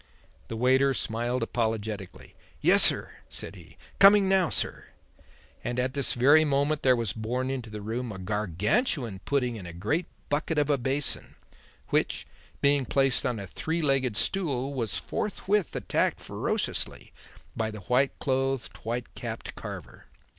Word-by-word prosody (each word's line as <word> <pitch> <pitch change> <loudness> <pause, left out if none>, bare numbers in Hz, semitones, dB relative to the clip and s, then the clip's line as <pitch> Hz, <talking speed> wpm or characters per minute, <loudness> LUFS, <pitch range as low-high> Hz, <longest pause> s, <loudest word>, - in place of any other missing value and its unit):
The 115 - -5
waiter 130 +3 +3
smiled 120 +2 -1
apologetically. 110 -4 -3 0.3
"Yessir!" - - +5 0.2
said - - -5
he. - - -15 0.2
"Coming 200 0 +8
now, 190 -3 +3
sir." - - 0 0.8
And 120 - -3
at 130 +1 0
this 140 -2 0
very 145 +6 +6
moment 145 +1 +1
there 130 -1 +5
was 115 -4 -1
borne 125 +4 -2
into 125 -4 -4
the 105 -1 -7
room 115 +2 -3
a 95 - -7
Gargantuan 105 - 0
pudding 125 -4 0
in 95 -4 -8
a 85 - -8
great 130 - -1 0.2
bucket 150 +2 -1
of 150 0 +3
a 140 - +2
basin, 135 +3 -1 0.5
which - - 0 0.4
being 140 -1 +4
placed 135 0 +2
on 120 -2 -1
a 100 - -5
three 160 - -3
legged 135 -6 +2
stool 140 -8 -1
was 115 -7 -1
forthwith 205 -2 -1
attacked - - 0
ferociously - - -3 0.4
by 110 -1 -1
the 105 -1 -8
white 125 +8 +1
clothed, 135 -1 -1
white 120 +2 -4
capped - - -6
carver. - - -9
130 Hz, 145 wpm, -28 LUFS, 110-145 Hz, 0.8 s, Coming